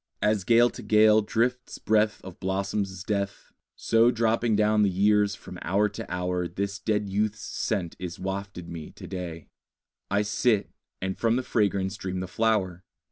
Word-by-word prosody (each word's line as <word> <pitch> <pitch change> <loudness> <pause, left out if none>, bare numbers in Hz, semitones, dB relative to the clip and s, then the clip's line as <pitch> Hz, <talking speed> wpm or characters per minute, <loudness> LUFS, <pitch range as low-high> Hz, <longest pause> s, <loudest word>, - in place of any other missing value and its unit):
As 105 -2 +2
gale 120 +4 +5
to - - -9
gale 110 0 +5
drifts 125 +4 -1
breath 110 0 +1
Of 95 -2 -10
blossoms' 95 0 -2
death, 100 0 -3 0.2
So 115 +1 +3
dropping 115 -1 +1
down 105 0 +3
the 100 - +4
years 100 +1 +3
from 90 -1 -10
hour 100 +4 +2
to - - -8
hour 90 0 -1
This 100 +3 -4
dead 105 -2 0
youth's 105 +2 -1
scent 95 -7 -2
is 90 -2 -5
wafted 95 -2 -5
me 85 -3 -7
to 95 - -12
day: 90 -3 -6 0.6
I 100 +1 +2
sit, 105 +1 +1 0.3
and 95 0 -2
from 115 0 +2
the 130 - 0
fragrance 100 -4 0
dream 95 -1 -4
the 95 - -4
flower. 95 -4 0
100 Hz, 165 wpm, -27 LUFS, 95-110 Hz, 0.6 s, gale